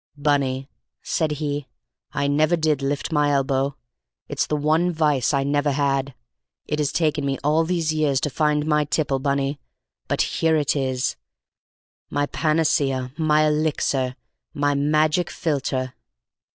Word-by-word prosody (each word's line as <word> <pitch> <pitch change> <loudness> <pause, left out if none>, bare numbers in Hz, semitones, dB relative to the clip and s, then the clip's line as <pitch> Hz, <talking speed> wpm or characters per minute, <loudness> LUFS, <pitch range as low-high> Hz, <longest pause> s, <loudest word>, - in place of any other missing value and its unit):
"Bunny," 140 -2 0 0.4
said 155 -2 0
he, 145 -1 -3 0.4
"I 140 - -1
never 155 +4 +3
did 155 -4 +1
lift 140 +4 -2
my 150 -2 +2
elbow; 135 0 +1 0.5
it's - - -1
the 150 - 0
one 155 +4 +2
vice 150 -6 +1
I 140 -2 +1
never 145 +1 +1
had. 140 -1 0 0.5
It 150 - -2
has 145 -2 +1
taken 155 -3 0
me 135 -1 -1
all 155 +3 +3
these 165 -2 0
years 150 -4 +1
to 150 - -1
find 150 0 +1
my 150 -1 +2
tipple, 145 -2 0
Bunny; 140 +1 -1 0.5
but - - +1
here 160 -1 +1
it 150 -2 +1
is, 130 -2 -1 0.9
my 145 0 0
panacea, 145 -5 0
my 155 -1 +3
elixir, 150 -4 0 0.4
my 145 0 +1
magic 155 +4 +2
philtre!" 135 -5 -2
145 Hz, 140 wpm, -23 LUFS, 140-155 Hz, 0.9 s, never